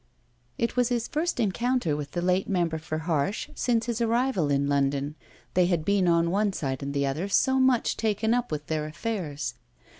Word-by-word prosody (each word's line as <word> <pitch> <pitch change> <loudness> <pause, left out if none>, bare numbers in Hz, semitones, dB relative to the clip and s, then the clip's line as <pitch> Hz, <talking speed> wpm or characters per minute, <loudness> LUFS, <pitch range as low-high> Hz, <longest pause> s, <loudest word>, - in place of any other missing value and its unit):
It 235 - -1
was 250 -1 +2
his 240 -1 -1
first 320 -1 -1
encounter 235 - +1
with 145 -1 -6
the 175 - -2
late 185 +1 +1
member 170 -4 0
for 155 0 -4
Harsh 165 +5 -1
since 230 -2 0
his 235 -1 -2
arrival 235 - +1
in 140 0 +2
London: 140 0 0 0.4
they 180 -1 +4
had 170 -4 0
been 200 -1 +2
on 170 0 +3
one 200 +1 +1
side 135 -6 -3
and 140 0 -3
the 140 0 +1
other 150 +8 -2
so 265 +6 +3
much 260 -2 +2
taken 220 +1 +1
up 245 0 -1
with 150 -1 -3
their 155 -1 -2
affairs. 155 - -3
180 Hz, 190 wpm, -27 LUFS, 150-230 Hz, 0.4 s, they